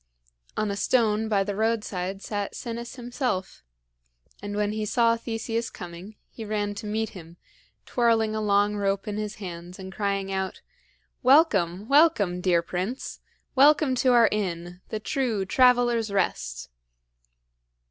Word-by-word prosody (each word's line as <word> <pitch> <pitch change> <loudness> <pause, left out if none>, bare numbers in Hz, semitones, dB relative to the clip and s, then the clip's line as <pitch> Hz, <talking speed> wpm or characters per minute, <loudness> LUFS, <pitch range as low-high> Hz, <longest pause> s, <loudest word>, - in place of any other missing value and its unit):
On 215 -1 0
a - - -2
stone 220 0 +1
by 200 -2 +2
the 200 0 -4
roadside 200 -3 -2
sat 205 -2 -3
Sinis 235 +1 -6
himself; 245 -6 -3 0.8
and 205 0 -5
when 205 0 0
he 215 0 -3
saw 230 +2 +3
Theseus 230 0 -3
coming, 180 +4 -9 0.2
he 225 - -8
ran 205 -1 -2
to 205 +1 -7
meet 220 +1 -1
him, 170 -2 -12 0.5
twirling 225 -3 +2
a 215 - -2
long 205 0 +2
rope 200 0 -1
in 210 0 -3
his 215 0 -4
hands 175 -2 -8
and 190 0 -9
crying 195 -1 -1
out: 190 -1 -3 0.6
"Welcome, 215 - +4
welcome, 275 - +4
dear 175 -2 +2
prince! 185 +9 -4 0.3
Welcome 290 0 +5
to 255 +1 +3
our 235 -2 +6
inn 180 -3 -3
the 215 - -3
true 230 -5 -1
Traveler's 240 -1 +3
Rest!" 60 - -2
210 Hz, 140 wpm, -26 LUFS, 190-230 Hz, 0.8 s, our